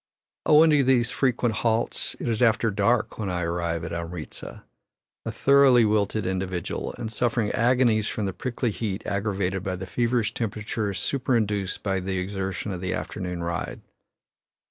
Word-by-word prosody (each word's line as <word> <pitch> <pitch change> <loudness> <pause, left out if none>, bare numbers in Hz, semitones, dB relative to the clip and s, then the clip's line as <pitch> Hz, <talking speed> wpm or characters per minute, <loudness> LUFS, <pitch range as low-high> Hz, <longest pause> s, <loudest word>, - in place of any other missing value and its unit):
Owing 155 +1 +7
to 145 -2 +4
these 125 -2 +3
frequent 120 -4 +1
halts, 115 0 0
it - - -4
is 115 -1 0
after 115 -1 +3
dark 105 +4 +1
when 100 -3 -2
I 90 -1 -1
arrive 85 -1 -2
at 85 0 -5
Amritza 85 -1 -6 0.6
a - - -1
thoroughly 135 -4 +5
wilted 105 0 +1
individual, 95 -1 -3
and 115 -2 -4
suffering 115 -1 0
agonies 115 -2 +3
from 110 - -2
the 95 - -2
prickly 120 0 -2
heat 105 -1 -4
aggravated 100 -2 -1
by 95 -2 -2
the 95 +1 -6
feverish 115 +2 0
temperature 105 -1 -2
superinduced 105 -5 -1
by 95 -2 0
the 95 +1 -3
exertion 95 +2 -3
of 90 -2 -5
the 95 0 -1
afternoon 90 -3 -4
ride. 85 0 -3
105 Hz, 155 wpm, -25 LUFS, 95-120 Hz, 0.6 s, Owing